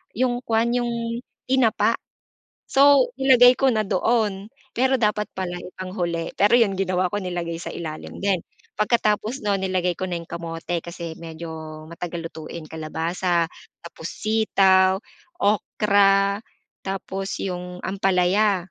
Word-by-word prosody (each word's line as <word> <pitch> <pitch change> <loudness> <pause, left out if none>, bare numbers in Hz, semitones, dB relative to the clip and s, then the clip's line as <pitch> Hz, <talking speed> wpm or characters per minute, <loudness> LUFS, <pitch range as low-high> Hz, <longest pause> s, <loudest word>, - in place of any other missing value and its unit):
'yung 245 0 +1
kuwan 230 +1 +2
'yung 235 -1 -1 0.2
tinapa, 255 -4 +2 0.7
so 275 -2 +6
nilagay 255 -2 +6
ko 270 - +3
na 215 -1 +1
doon. 210 -1 0 0.2
Pero 260 +2 +2
dapat 210 -4 +1
pala 180 -2 -3
ipang 185 +1 -8
huli, 170 -3 -2
pero 210 +4 +5
'yun 205 -6 +4
ginawa 185 -1 +1
ko 205 - -1
nilagay 175 -3 -3
sa 170 - -6
ilalim 155 +1 -7
din, 195 -2 +2 0.4
pagkatapos 215 +3 +1
nun 205 -1 +1
nilagay 185 -2 -1
ko 185 - -2
na 180 - -3
'yung 165 - -12
kamote 170 0 -4
kasi 170 -1 -7
medyo 165 0 -8 0.4
matagal 170 -1 -5
lutuin, 160 +1 -8
kalabasa, 165 +2 -1 0.3
tapos 170 -1 -9
sitaw, 195 -3 +3 0.4
okra, 200 -1 +3 0.5
tapos 195 0 -4
'yung 180 -1 -5
ampalaya. 190 0 +1
195 Hz, 130 wpm, -23 LUFS, 175-220 Hz, 0.7 s, so